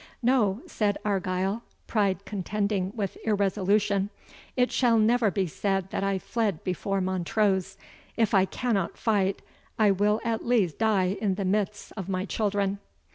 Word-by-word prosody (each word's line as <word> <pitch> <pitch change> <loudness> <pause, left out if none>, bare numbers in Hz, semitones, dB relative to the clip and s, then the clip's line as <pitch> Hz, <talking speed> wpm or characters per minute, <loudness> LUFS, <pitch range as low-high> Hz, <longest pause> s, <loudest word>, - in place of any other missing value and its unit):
"No," 235 -4 +2
said 205 -2 0
Argyle, 195 +1 0 0.2
pride 200 -3 0
contending 200 -1 -1
with 200 -4 -3
irresolution, 200 -1 +1 0.5
"it 250 0 +3
shall 240 -3 +3
never 225 +1 +4
be 195 -1 0
said 195 +2 -2
that - - -2
I 195 -1 +1
fled 205 -3 -2
before 195 +2 -1
Montrose; 190 +1 0 0.4
if 225 -2 +2
I 190 -1 +5
cannot 205 -3 -1
fight, 200 -4 +1 0.3
I 215 -2 +5
will 205 +3 +2
at 230 -1 -1
least 220 -10 +1
die 200 -4 +2
in 200 -3 +1
the 195 0 -2
midst 205 +1 -1
of 195 -3 -5
my 185 0 -1
children." 200 -2 -1
200 Hz, 145 wpm, -27 LUFS, 190-215 Hz, 0.5 s, I